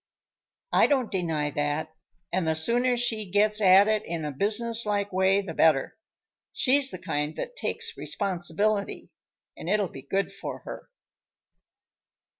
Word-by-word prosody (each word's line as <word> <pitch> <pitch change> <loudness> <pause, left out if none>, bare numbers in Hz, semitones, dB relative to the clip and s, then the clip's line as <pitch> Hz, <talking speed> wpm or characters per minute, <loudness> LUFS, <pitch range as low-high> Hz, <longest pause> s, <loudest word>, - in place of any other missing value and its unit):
"I - - +5
don't 265 -5 0
deny 160 -6 -1
that, 145 +2 -2 0.4
and 180 -2 0
the 160 - +1
sooner 245 +9 +2
she 225 -4 -1
gets 210 +2 +2
at 195 +1 +6
it 215 -1 0
in 165 -2 -5
a 150 - -3
businesslike 210 - +1
way, 190 +1 +2
the 185 -4 -7
better. 155 -4 +2 0.6
She's 275 +1 +4
the 185 - -6
kind 150 -4 -3
that - - -6
takes - - -2
responsibility, 200 +2 -2 0.4
and 170 - -7
it'll 205 -1 +1
be 135 - -10
good 195 +9 -2
for - - -7
her." - - -10
195 Hz, 140 wpm, -26 LUFS, 160-215 Hz, 0.6 s, at